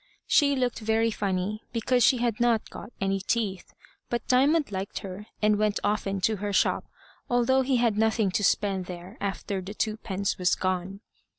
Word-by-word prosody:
She 280 Hz, -1 st, +4 dB
looked 250 Hz, -3 st, -1 dB
very 225 Hz, +1 st, +1 dB
funny, 200 Hz, +1 st, -2 dB
because 245 Hz, +1 st, +2 dB
she 255 Hz, -, +5 dB
had 235 Hz, -2 st, -1 dB
not 235 Hz, -2 st, +1 dB
got 210 Hz, -, -9 dB
any 195 Hz, 0 st, 0 dB
teeth, 195 Hz, -2 st, -2 dB, 0.4 s
but 240 Hz, -2 st, -3 dB
Diamond 280 Hz, +1 st, +3 dB
liked 195 Hz, 0 st, -4 dB
her, 195 Hz, +3 st, -8 dB, 0.2 s
and 210 Hz, -1 st, +3 dB
went 210 Hz, -1 st, +1 dB
often 205 Hz, -1 st, 0 dB
to 215 Hz, +2 st, +1 dB
her 205 Hz, +1 st, -3 dB
shop, 195 Hz, -, +2 dB, 0.4 s
although 245 Hz, +2 st, +3 dB
he 260 Hz, 0 st, +1 dB
had 230 Hz, -3 st, +2 dB
nothing 220 Hz, -2 st, +2 dB
to 205 Hz, -, 0 dB
spend 195 Hz, -2 st, +1 dB
there 180 Hz, +3 st, -8 dB
after 195 Hz, 0 st, -3 dB
the 195 Hz, +3 st, -8 dB
twopence 205 Hz, -3 st, -2 dB
was 180 Hz, -1 st, +3 dB
gone. 185 Hz, +1 st, -2 dB
210 Hz, 175 wpm, -27 LUFS, 195-235 Hz, 0.4 s, she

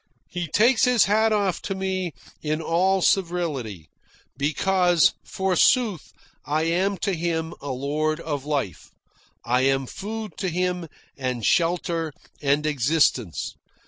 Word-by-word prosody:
He 175 Hz, -1 st, -3 dB
takes 235 Hz, -, +4 dB
his 250 Hz, -3 st, +5 dB
hat 220 Hz, +2 st, +3 dB
off 200 Hz, -4 st, +1 dB
to 195 Hz, -, -3 dB
me 190 Hz, -3 st, -2 dB, 0.3 s
in 155 Hz, 0 st, -1 dB
all 185 Hz, +3 st, +2 dB
servility, 150 Hz, -, 0 dB, 0.5 s
because, 175 Hz, +3 st, +3 dB
forsooth, 190 Hz, -, +1 dB, 0.3 s
I 155 Hz, +2 st, 0 dB
am 185 Hz, +4 st, +1 dB
to 200 Hz, -, +1 dB
him 165 Hz, -1 st, -2 dB
a 140 Hz, -, -6 dB
lord 150 Hz, +4 st, -1 dB
of 145 Hz, -5 st, -3 dB
life. 140 Hz, -10 st, -3 dB, 0.6 s
I 125 Hz, +2 st, +2 dB
am 135 Hz, 0 st, +2 dB
food 210 Hz, -, -6 dB
to 190 Hz, -, -1 dB
him, 180 Hz, 0 st, -1 dB, 0.3 s
and 125 Hz, -4 st, -3 dB
shelter, 165 Hz, -2 st, +1 dB, 0.3 s
and 145 Hz, +1 st, +2 dB
existence. 140 Hz, -, +1 dB
165 Hz, 125 wpm, -24 LUFS, 145-190 Hz, 0.6 s, his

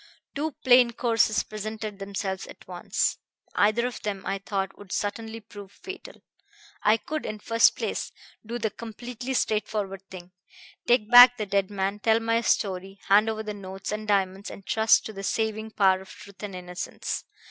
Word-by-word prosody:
"Two 300 Hz, +2 st, -2 dB
plain 245 Hz, -1 st, +7 dB
courses 225 Hz, -2 st, +2 dB
presented 215 Hz, -1 st, -6 dB
themselves 195 Hz, -1 st, -4 dB
at -, -, -14 dB
once. -, -, -1 dB, 0.3 s
Either 215 Hz, +4 st, +3 dB
of 250 Hz, -2 st, -4 dB
them, 200 Hz, -2 st, -4 dB
I 195 Hz, 0 st, -2 dB
thought, 195 Hz, -1 st, -3 dB
would 205 Hz, -2 st, -14 dB
certainly 220 Hz, +2 st, -3 dB
prove 205 Hz, -2 st, -12 dB
fatal. 380 Hz, -, -10 dB, 0.6 s
I 215 Hz, +1 st, +4 dB
could, 310 Hz, +7 st, -4 dB
in 215 Hz, -, -4 dB
the 210 Hz, -, -22 dB
first 230 Hz, 0 st, +4 dB
place, -, -, -3 dB, 0.3 s
do 230 Hz, +2 st, -4 dB
the 220 Hz, -2 st, -1 dB
completely 240 Hz, +4 st, -6 dB
straightforward 210 Hz, -4 st, -1 dB
thing: 180 Hz, -1 st, -10 dB, 0.6 s
take 235 Hz, -2 st, +3 dB
back 245 Hz, 0 st, +10 dB
the 215 Hz, -, -2 dB
dead 195 Hz, -1 st, 0 dB
man, 200 Hz, 0 st, -2 dB
tell 225 Hz, +1 st, +3 dB
my 230 Hz, 0 st, +1 dB
story, 195 Hz, -3 st, -1 dB
hand 210 Hz, +3 st, +6 dB
over 220 Hz, 0 st, -3 dB
the 210 Hz, -1 st, -4 dB
notes 195 Hz, -1 st, -7 dB
and 215 Hz, 0 st, -4 dB
diamonds, 195 Hz, -1 st, 0 dB
and 195 Hz, -, -11 dB
trust 220 Hz, 0 st, +4 dB
to 220 Hz, -, -6 dB
the 195 Hz, -, -7 dB
saving 220 Hz, +1 st, -1 dB
power 190 Hz, -3 st, +3 dB
of 190 Hz, -, -14 dB
truth 200 Hz, -2 st, -13 dB
and 205 Hz, -3 st, -6 dB
innocence. 180 Hz, 0 st, -5 dB
210 Hz, 175 wpm, -26 LUFS, 195-225 Hz, 0.6 s, back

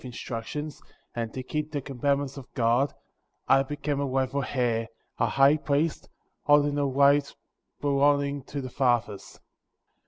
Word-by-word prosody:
instructions, 130 Hz, +4 st, -6 dB, 0.3 s
and 115 Hz, -1 st, -3 dB
to 130 Hz, -, -6 dB
keep 150 Hz, +3 st, -3 dB
the 145 Hz, -, -2 dB
commandments 140 Hz, +1 st, -1 dB
of 135 Hz, -2 st, -11 dB
God, 120 Hz, +2 st, +2 dB, 0.6 s
I 135 Hz, -, +5 dB
became 145 Hz, +1 st, -3 dB
a 140 Hz, -, 0 dB
rightful 135 Hz, +1 st, 0 dB
heir, 120 Hz, -4 st, -1 dB, 0.3 s
a 115 Hz, -, +3 dB
High 135 Hz, +6 st, +4 dB
Priest, 150 Hz, +2 st, -1 dB, 0.3 s
holding 145 Hz, 0 st, +4 dB
the 145 Hz, -1 st, +1 dB
right 140 Hz, +1 st, +3 dB, 0.5 s
belonging 140 Hz, 0 st, +2 dB
to 140 Hz, -1 st, -5 dB
the 130 Hz, -1 st, -7 dB
fathers. 120 Hz, -6 st, -1 dB
140 Hz, 135 wpm, -27 LUFS, 125-145 Hz, 0.6 s, I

